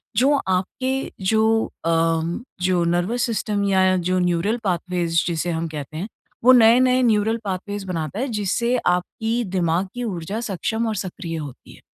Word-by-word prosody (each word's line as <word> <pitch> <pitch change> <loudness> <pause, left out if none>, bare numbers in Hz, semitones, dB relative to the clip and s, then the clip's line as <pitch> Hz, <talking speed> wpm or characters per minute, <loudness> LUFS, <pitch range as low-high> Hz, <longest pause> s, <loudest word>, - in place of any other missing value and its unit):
जो 270 +4 +4
आपके 255 +9 -1
जो 220 +2 +3 0.2
अ, - - +1 0.7
जो 180 -1 +2
नर्वस 175 +8 0
सिस्टम 210 -3 -1
या 190 -1 +4
जो 185 +1 0
न्यूरल 180 +5 +1
पाथवेज़ 175 -3 0
जिसे 170 0 -1
हम 165 0 -2
कहते 155 -1 -7
हैं, 185 +6 -4 0.4
वो 255 - +8
नए-नए 250 +2 +5
न्यूरल 220 -1 +2
पाथवेज़ 200 +1 -4
बनाता 170 +2 -3
है, 265 - -1
जिससे 225 +2 0
आपकी 220 +7 0
दिमाग 175 +1 +1
की 245 - -4
ऊर्जा 195 -1 -4
सक्षम 220 +2 -2
और 220 - -1
सक्रिय 180 -3 -5
होती 145 -5 -9
है। - - -17
190 Hz, 155 wpm, -22 LUFS, 175-225 Hz, 0.7 s, वो